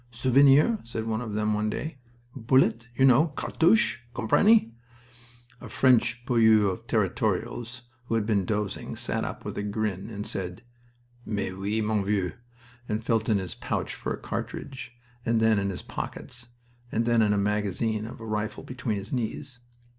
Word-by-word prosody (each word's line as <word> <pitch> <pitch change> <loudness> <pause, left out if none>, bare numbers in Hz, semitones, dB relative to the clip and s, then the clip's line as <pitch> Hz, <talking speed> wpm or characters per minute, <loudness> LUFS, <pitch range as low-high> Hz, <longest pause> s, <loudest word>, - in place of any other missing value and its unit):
"Souvenir!" 135 - +4
said 115 -1 -5
one 110 0 -1
of 110 -4 -5
them 105 0 +1
one 105 +1 0
day. 150 +5 -5 0.4
"Bullet 115 -2 +2
you 130 - +4
know 135 +5 +6
cartouche. 165 - +2 0.2
Comprenny?" 120 - +4 0.9
A - - -9
French 120 -2 +3
poilu 110 -5 +4
of 90 - -8
Territorials, 120 +1 -1 0.2
who 115 - -1
had 110 -2 +1
been 105 -3 +2
dozing, 105 +1 -3
sat - - -2
up - - -6
with - - -4
a - - -1
grin 105 -1 -2
and 105 -2 -5
said, 90 +3 -4 0.6
"Mais 100 -4 -3
oui, 100 +4 -2
mon 105 -1 0
vieux," 95 -3 0 0.6
and 110 +1 -1
felt 115 -1 0
in 105 - +4
his 95 -4 -4
pouch - - -3
for - - -5
a - - -2
cartridge, 135 -3 -6 0.3
and 115 -1 +2
then 110 -2 +4
in 100 0 -1
his 95 - -5
pockets, 120 -1 -6 0.4
and 115 +1 0
then 120 -1 +3
in 105 - +3
the 105 - +2
magazine 105 +2 0
of - - -9
the 115 - -9
rifle 105 -1 -3
between 125 -4 -3
his 100 +5 -7
knees. 125 +2 -3
110 Hz, 170 wpm, -27 LUFS, 105-120 Hz, 0.9 s, know